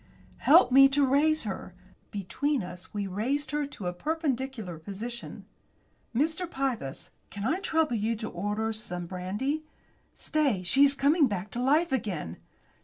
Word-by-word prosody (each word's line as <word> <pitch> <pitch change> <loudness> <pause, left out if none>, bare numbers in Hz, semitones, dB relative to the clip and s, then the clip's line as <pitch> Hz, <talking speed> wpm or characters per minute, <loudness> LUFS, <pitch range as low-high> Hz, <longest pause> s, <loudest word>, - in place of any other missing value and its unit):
"Help - - +6
me 275 +1 +8
to 280 +1 +3
raise 300 +4 +3
her." 190 -3 -6 0.3
Between 245 +7 -1
us 180 0 -8
we 205 -1 -3
raised 255 +9 -1
her 295 -1 -1
to 215 -9 -8
a 180 - -1
perpendicular 265 - -3
position. 220 +7 -6 0.7
"Mr. 320 +6 0
Pybus, 260 - -3 0.2
can 200 +1 -5
I 320 +9 +1
trouble 320 -8 +1
you 220 +2 0
to 220 0 -5
order 210 +5 -2
some 180 -5 -3
brandy? 205 - -3 0.5
Stay, 280 - 0
she 270 +10 +4
is 280 0 +5
coming 285 +2 +4
back 200 -2 -4
to 240 - -3
life 300 +7 +3
again!" 190 - -2
245 Hz, 150 wpm, -28 LUFS, 200-285 Hz, 0.7 s, me